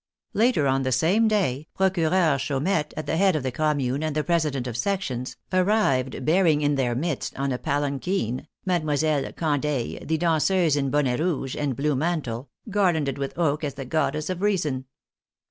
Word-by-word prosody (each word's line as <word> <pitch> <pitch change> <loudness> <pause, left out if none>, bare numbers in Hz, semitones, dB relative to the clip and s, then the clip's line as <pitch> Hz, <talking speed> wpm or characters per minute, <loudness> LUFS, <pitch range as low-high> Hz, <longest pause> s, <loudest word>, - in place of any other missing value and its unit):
Later 220 - +3
on 135 0 +2
the 130 -1 -1
same 180 - +3
day, 160 -10 0
Procureur 175 -5 +2
Chaumette, 150 +4 0
at 155 - -3
the 160 - -1
head 190 -1 +4
of 150 - -1
the 130 - -1
Commune 145 -2 0
and 155 -1 -2
the 155 - +1
presi 165 -3 +1
dents 130 -2 -3
of 120 - -5
sections, 130 -5 -2 0.2
arrived 180 - +1
bearing 160 -2 +3
in 145 0 +2
their 125 -4 0
midst, 150 +2 -3
on 135 0 -1
a 125 - -2
palanquin, 140 - -1 0.2
Mdlle. 155 -5 0
Candeille, 145 -5 -1
the 160 - 0
danseuse, 165 0 +2
in 140 -2 0
bonnet 135 -3 +1
rouge 150 -6 -1
and 145 -3 -1
blue 145 +2 0
mantle, 140 -5 -2 0.2
garlanded 170 -10 +1
with 140 +2 -4
oak 155 -3 +1
as 140 -2 -3
the 135 -1 -6
Goddess 155 +3 -1
of 180 0 -4
Reason. 155 -11 0
150 Hz, 175 wpm, -25 LUFS, 135-175 Hz, 0.2 s, head